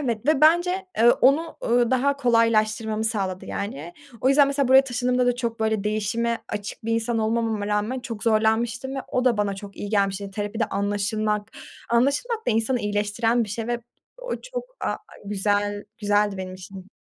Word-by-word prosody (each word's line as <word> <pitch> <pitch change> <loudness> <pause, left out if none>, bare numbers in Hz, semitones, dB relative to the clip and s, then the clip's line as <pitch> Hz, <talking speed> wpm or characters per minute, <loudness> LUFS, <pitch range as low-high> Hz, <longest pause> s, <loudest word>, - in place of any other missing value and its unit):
Evet 235 -4 -2
ve 305 -2 +3
bence, 350 +4 +3
eee, 235 +1 +7
onu, 290 +8 +2
ööö, 240 0 +2
daha 275 +2 +2
kolaylaştırmamı 220 -3 +2
sağladı, 195 -4 -2
yani. 175 -5 -5 0.3
O 260 - +2
yüzden 275 +1 +6
mesela 280 -2 0
buraya 265 +1 +7
taşındığımda 250 0 0
da 245 - +3
çok 230 -2 -3
böyle 220 -2 0
değişime 225 +2 -1
açık 205 +1 -6
bir 230 - -1
insan 230 +1 0
olmamama 220 -1 0
rağmen 210 +5 -1
çok 230 -4 -7
zorlanmıştım 230 +4 +1
ve - - -2
o 250 0 0
da 240 -3 +3
bana 205 -1 0
çok 200 0 -10
iyi 205 - -5
gelmişti. 200 -1 0
Terapide 205 +2 -2
anlaşılmak. 205 +1 -1 0.4
Anlaşılmak 290 - +1
da - - +3
insanı 225 +3 +1
iyileştiren 210 +3 0
bir - - -10
şey 225 +2 -4
ve 240 0 -2 0.4
o - - -8
çok, - - -6 0.2
aaa, - - -1 0.3
güzel 205 0 0
güzeldi 205 -1 +1
benim 185 -1 -6
için. 185 +1 -11
225 Hz, 175 wpm, -24 LUFS, 205-250 Hz, 0.4 s, eee